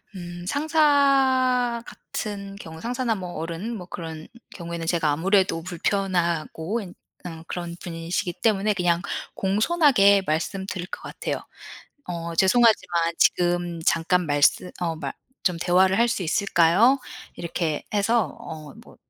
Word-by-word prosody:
음 175 -1 -8
상사 270 - +3
같은 200 -2 -6
경우 160 -4 -10
상사나 245 0 -1
뭐 180 -3 -6
어른 170 +8 -4
뭐 180 - -8
그런 160 -3 -7 0.2
경우에는 170 -2 -6
제가 165 -3 +1
아무래도 185 +2 +2
불편하고 175 +1 -1
엔 180 -4 -9 0.3
어 165 -2 -8
그런 175 -1 -5
분이시기 170 +1 -3
때문에 210 -1 +2
그냥 175 -2 +1 0.3
공손하게 205 - +4
말씀드릴 180 +3 -2
것 - - -7
같아요. - - -5 0.6
"어 170 -1 -5
죄송하지만 185 -5 +3
지금 175 -1 +1
잠깐 175 +1 +2
말씀 145 +5 +2
어 170 -2 -2
말 160 - -5 0.3
좀 180 -3 +1
대화를 185 +3 +3
할 235 - +5
수 230 -5 -1
있을까요?" 190 - +3 0.4
이렇게 165 -2 -2
해서 215 +2 +1
어 155 -3 -9
뭐 - - -17
180 Hz, 270 characters per minute, -24 LUFS, 170-215 Hz, 0.6 s, 할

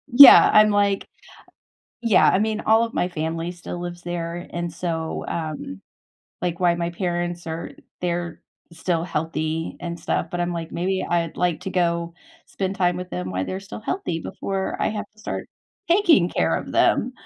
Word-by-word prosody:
Yeah, 280 +2 +11
I'm 215 0 +7
like 205 -1 +1 0.9
yeah, 230 -4 +5
I - - +3
mean, 215 0 0
all 225 +1 +4
of 230 - -4
my 180 - +1
family 165 +1 -3
still 175 0 -7
lives 175 0 -6
there. 175 0 -4
And 170 -1 -4
so, 165 -1 -3
um 155 - -5 0.6
like, 175 -1 -2
while 175 -1 +3
my 170 0 -2
parents 175 -1 -3
are 165 +1 -5 0.3
they're 175 -1 -3 0.3
still 165 0 -1
healthy 160 -1 -3
and 170 0 -5
stuff, - - -1
but 175 - -3
I'm 175 0 -1
like, 165 -1 -5
maybe 185 +2 -1
I'd 170 -2 0
like 175 -2 +1
to 190 - -4
go 170 -2 0 0.3
spend 195 0 -3
time 175 -1 +2
with 180 0 -6
them 90 +1 -4
while 95 0 -2
they're 190 +1 -4
still 195 - -9
healthy 220 - -3
before 195 +3 -3
I - - +2
have 210 -1 -4
to - - -28
start 215 - -5 0.4
taking 340 - +5
care - - +1
of - - -5
them. - - +2
175 Hz, 175 wpm, -23 LUFS, 165-190 Hz, 0.9 s, Yeah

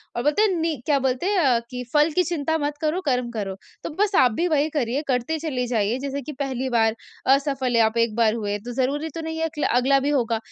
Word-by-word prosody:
और 240 - -2
बोलते 300 +8 +2
हैं 430 - +4
नि 325 -1 0
क्या 290 -2 +3
बोलते 260 +3 -1
हैं? 400 0 +1
अ, 255 -8 +3
कि 250 -1 -5
फल 300 +2 +5
की 365 - +4
चिंता 320 -1 -1
मत 290 -1 -2
करो, 315 +4 0
कर्म 250 -7 0
करो। 200 -4 -4 0.3
तो - - -3
बस 415 -1 +2
आप 250 -3 +5
भी 340 +11 0
वही 305 -1 +2
करिए 275 -2 -1
करते 255 +5 0
चली 275 -6 -2
जाइए 225 0 0
जैसे 280 0 -4
कि 300 - -7
पहली 265 -2 -2
बार, 225 -2 +2 0.3
असफल 270 -2 +2
है 230 - +5
आप 220 +1 +1
एक 230 -2 +1
बार 225 -2 +3
हुए, 205 -2 -2
तो 245 +4 -8
ज़रूरी 280 +5 -1
तो 330 - -3
नहीं 320 0 -4
है 325 - +1 0.2
अगला 265 +3 +3
भी 280 +2 -1
होगा 235 -5 +1
270 Hz, 245 wpm, -23 LUFS, 240-310 Hz, 0.3 s, फल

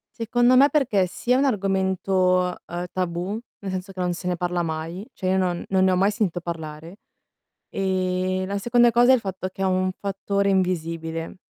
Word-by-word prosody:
Secondo 240 +2 +3
me 280 +2 +7
perché, 255 -10 +2
sì, 240 +7 -4
è - - +6
un 275 +2 +3
argomento, 190 -4 +1
uhm, 175 +1 -4
tabù 185 +3 -2 0.2
nel 195 - -4
senso 185 +1 -5
che 190 - -11
non 180 -1 0
se 180 +1 -6
ne 180 - 0
parla 175 0 -1
mai, 165 +4 -4
cioè 185 - -4
io 190 +1 +2
non 180 -2 0
non 190 -1 +2
ne 190 - +4
ho - - +2
mai 195 +3 +3
sentito 205 -5 -1
parlare, 165 0 -7 0.7
e 185 -1 -1
la 200 +1 -3
seconda 240 +3 +4
cosa 240 +2 +5
è - - +7
il 255 - +1
fatto 190 -2 -4
che 195 - -6
è - - +2
un 185 0 +1
fattore 200 0 -1
invisibile. 165 -3 -2
185 Hz, 200 wpm, -24 LUFS, 180-200 Hz, 0.7 s, me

